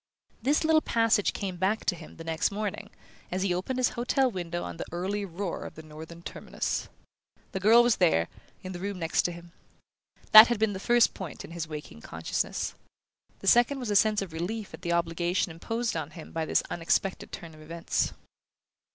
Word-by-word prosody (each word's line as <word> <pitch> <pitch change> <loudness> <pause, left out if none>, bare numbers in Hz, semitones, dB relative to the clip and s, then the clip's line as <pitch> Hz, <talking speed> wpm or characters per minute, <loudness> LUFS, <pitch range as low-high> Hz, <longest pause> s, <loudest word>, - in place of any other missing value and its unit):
This 285 +7 +2
little 315 0 +4
passage 230 -5 +2
came 190 -3 -4
back 195 +5 0
to - - +2
him 165 -2 -12
the 165 - -8
next 165 -1 0
morning, 205 0 -4 0.4
as 185 +1 -1
he 190 -2 +1
opened 190 +9 -2
his 255 -1 +3
hotel 255 +2 +1
window 175 -3 -4
on 85 -1 -6
the - - -4
early 195 +4 -2
roar 185 0 -4
of - - -8
the 160 - -10
Northern 160 +2 -11
Terminus. - - -3 0.6
The 190 - -3
girl 225 +5 +7
was 240 -2 +3
there, 125 - +3 0.4
in 185 - -6
the 175 - -6
room 200 +1 -4
next 165 -2 +1
to 175 - +1
him. 170 0 -11 0.8
That 215 +2 +12
had 240 - 0
been 215 -1 +1
the 190 - -5
first 240 +3 +4
point 185 -6 -7
in - - -12
his 165 -1 -4
waking 150 - -8
consciousness. 80 +1 -3 0.7
The 195 - -6
second 240 +6 +5
was 245 -5 -3
a - - +1
sense 210 0 +4
of 175 -4 -9
relief 200 +6 -4
at - - -9
the 170 - -2
obligation 170 +1 0
imposed 225 +8 -2
on 155 -3 -3
him 160 0 -11
by 160 -1 -2
this - - +2
unexpected 175 +3 -1
turn 165 -1 -8
of 155 - -14
everts. 165 +2 -1
185 Hz, 200 wpm, -28 LUFS, 165-215 Hz, 0.8 s, That